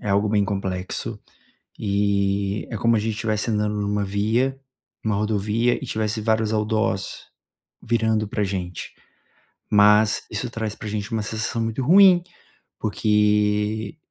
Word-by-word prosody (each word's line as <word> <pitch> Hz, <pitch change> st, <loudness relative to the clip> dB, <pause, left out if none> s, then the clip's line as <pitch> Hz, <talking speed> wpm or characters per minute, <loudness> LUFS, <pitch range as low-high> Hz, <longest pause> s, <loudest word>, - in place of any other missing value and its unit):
é -, -, -5 dB
algo 100 Hz, +1 st, +2 dB
bem 105 Hz, -1 st, +2 dB
complexo. 95 Hz, -2 st, -3 dB, 0.6 s
E 100 Hz, 0 st, 0 dB
é 115 Hz, -, -4 dB
como 115 Hz, +2 st, +2 dB
a -, -, +2 dB
gente 110 Hz, +1 st, -2 dB
estivesse 110 Hz, +1 st, -1 dB
andando 105 Hz, -1 st, 0 dB
em -, -, -1 dB
uma 100 Hz, 0 st, -1 dB
via, 110 Hz, +7 st, 0 dB, 0.4 s
uma 110 Hz, -2 st, 0 dB
rodovia 105 Hz, +3 st, +1 dB
e -, -, -5 dB
tivesse 110 Hz, -1 st, -2 dB
vários 110 Hz, 0 st, +1 dB
outdoors 110 Hz, -2 st, -1 dB, 0.6 s
virando 110 Hz, -2 st, 0 dB
para 105 Hz, 0 st, -2 dB
gente. 90 Hz, -3 st, -4 dB, 0.8 s
Mas 105 Hz, +1 st, +5 dB
isso 110 Hz, +3 st, -3 dB
traz 110 Hz, -2 st, -4 dB
para 110 Hz, -, -8 dB
gente 105 Hz, +2 st, -4 dB
uma 110 Hz, -1 st, 0 dB
sensação 110 Hz, +2 st, -2 dB
muito 115 Hz, +3 st, -2 dB
ruim, 180 Hz, +4 st, +6 dB, 0.6 s
porque 105 Hz, +3 st, +1 dB
105 Hz, 140 wpm, -23 LUFS, 105-110 Hz, 0.8 s, ruim